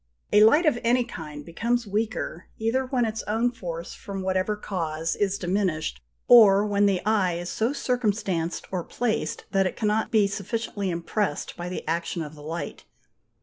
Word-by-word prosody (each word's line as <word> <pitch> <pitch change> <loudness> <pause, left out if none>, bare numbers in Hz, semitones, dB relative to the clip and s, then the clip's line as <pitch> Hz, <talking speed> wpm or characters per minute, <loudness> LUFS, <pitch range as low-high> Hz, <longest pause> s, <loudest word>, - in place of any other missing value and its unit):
A 210 +1 +8
light 295 +11 +6
of 290 -6 +3
any 245 +2 +3
kind 150 -10 -8
becomes 235 +8 -1
weaker, 210 -4 -3
either 245 +4 0
when 250 -2 +1
its 220 0 -3
own 225 +3 +1
force, 170 -7 -6
from 195 -2 -6
whatever 190 +2 0
cause, 165 -5 -3
is 200 -1 0
diminished, 175 - -1 0.3
or 210 -4 +8
when 205 -1 +3
the 190 -2 0
eye 205 -5 +2
is 175 +1 -4
so 225 +3 0
circumstanced 205 - -1
or 180 -2 -2
placed, 230 +2 -2
that 195 -2 +3
it - - -6
cannot 215 0 +1
be 220 -4 +4
sufficiently 200 0 -3
impressed 170 0 -2
by 175 +1 -5
the 180 - -6
action 170 +1 -1
of 150 0 -8
the 150 - -13
light. 165 +3 -5
200 Hz, 170 wpm, -26 LUFS, 175-225 Hz, 0.3 s, A